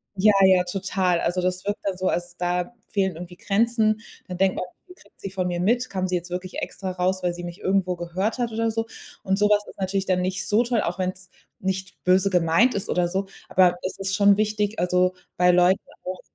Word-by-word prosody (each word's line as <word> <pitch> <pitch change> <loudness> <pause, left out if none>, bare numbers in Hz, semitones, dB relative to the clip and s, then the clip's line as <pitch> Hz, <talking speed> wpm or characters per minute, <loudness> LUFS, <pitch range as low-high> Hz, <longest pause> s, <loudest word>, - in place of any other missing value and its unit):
Ja, 205 +2 +5
ja, 185 -1 +5
total. 185 -1 0
Also, 180 +1 0
das 185 +1 -2
wirkt 205 +1 -2
dann 195 -2 -2
so, 185 - -1
als 175 0 -3
da 180 +4 -1
fehlen 190 -4 0
irgendwie 175 +1 -9
Grenzen. 215 +1 +1 0.3
Dann 180 -1 -6
denkt 190 0 +2
man: - - -3 0.2
„Wie 360 - -13
viel - - -27
kriegt - - -24
sie 195 - -4
von 185 -2 -2
mir 175 -1 -2
mit? 240 +7 +1
Kam 185 -1 -2
sie 180 - -1
jetzt 175 0 -4
wirklich 180 +1 -5
extra 190 -2 -4
raus, 185 +1 -1
weil 175 -1 +1
sie 175 0 -8
mich 175 0 -7
irgendwo 190 -1 +1
gehört 185 +7 -2
hat 235 -2 -1
oder 225 0 0
so?“ 225 0 -2 0.4
Und 190 0 +1
sowas 210 0 +3
ist - - -14
natürlich 190 0 -1
dann 180 -1 +1
nicht 185 +2 -2
so 215 +3 +3
toll, 235 -2 0
auch 175 +2 -2
wenn's 185 0 -3 0.3
nicht 190 0 -4
böse 185 +2 +4
gemeint 180 +7 +3
ist 200 - -3
oder 175 -1 +1
so. 190 +2 -2 0.2
Aber 180 -1 +4
es 185 - -4
ist 195 0 -1
schon 200 -1 +5
wichtig, 210 0 0
also 180 +1 +2 0.2
bei 180 0 +5
Leuten 180 +2 +4 0.2
auch 185 0 -5
185 Hz, 230 wpm, -24 LUFS, 180-200 Hz, 0.4 s, Ja